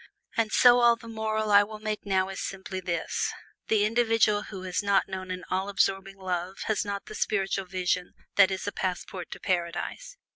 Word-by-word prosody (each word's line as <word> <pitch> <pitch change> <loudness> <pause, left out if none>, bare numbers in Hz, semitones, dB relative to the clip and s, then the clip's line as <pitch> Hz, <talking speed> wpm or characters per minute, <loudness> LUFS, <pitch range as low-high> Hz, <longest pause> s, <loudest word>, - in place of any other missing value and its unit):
And 225 -2 +1
so 245 +1 +7
all 235 -1 +6
the 230 0 -13
moral 220 -1 -1
I 205 0 +8
will 215 +1 -5
make 215 -1 -4
now 190 -1 +2
is 195 - -6
simply 190 -1 -5
this: 175 -2 -2 0.4
the 210 -2 +3
individual 225 -2 +3
who 190 -3 -8
has 180 -1 -1
not 200 -1 +2
known 185 -1 -6
an 185 0 -4
all 190 +2 0
absorbing 195 0 0
love 185 0 -3
has 215 -2 0
not 200 -1 -4
the - - -9
spiritual 195 -2 0
vision 180 -1 -1 0.2
that - - +7
is 190 -1 -3
a 205 - -1
passport 180 -1 -4
to - - -8
Paradise. 180 - -3
195 Hz, 190 wpm, -28 LUFS, 185-215 Hz, 0.4 s, I